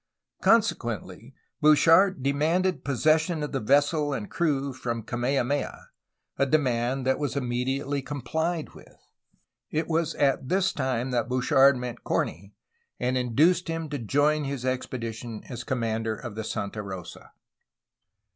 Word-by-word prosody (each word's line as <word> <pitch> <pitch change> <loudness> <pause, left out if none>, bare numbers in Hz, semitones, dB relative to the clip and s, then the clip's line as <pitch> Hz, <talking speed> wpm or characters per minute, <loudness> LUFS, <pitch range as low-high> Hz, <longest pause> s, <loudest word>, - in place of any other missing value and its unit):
'' - - -46
Con - - +6
sequently, - - -5 0.3
Bouchard 165 +2 +5
demanded 160 +7 +1
possession 155 +4 +2
of 150 - -4
the 135 - -1
vessel 145 +5 +2
and 105 -6 -5
crew 140 -5 0
from 115 -3 -4
Kamehameha, 130 +4 -2 0.5
a 140 - +3
demand 130 -3 +1
that 130 0 +1
was 145 -1 -2
immediately 135 +2 -1
complied 155 +5 -3
with. - - -16 0.7
It 155 +1 -1
was 165 0 0
at 135 -2 +1
this 190 0 +2
time 130 -2 -1
that 120 -1 0
Bouchard 130 +2 +4
met 125 -1 -6
Corney, 100 +4 -2 0.4
and 125 +1 0
induced 150 +9 +2
him 165 -1 -3
to 145 -1 -3
join 145 +6 +2
his 135 -2 -4
expedition 115 -3 -4
as 120 -2 -6
com 130 -2 -2
mander 110 -1 -1
of 120 -1 -7
the 110 +1 -5
Santa 105 0 -4
Rosa. 95 -4 -9
135 Hz, 140 wpm, -26 LUFS, 120-150 Hz, 0.7 s, Con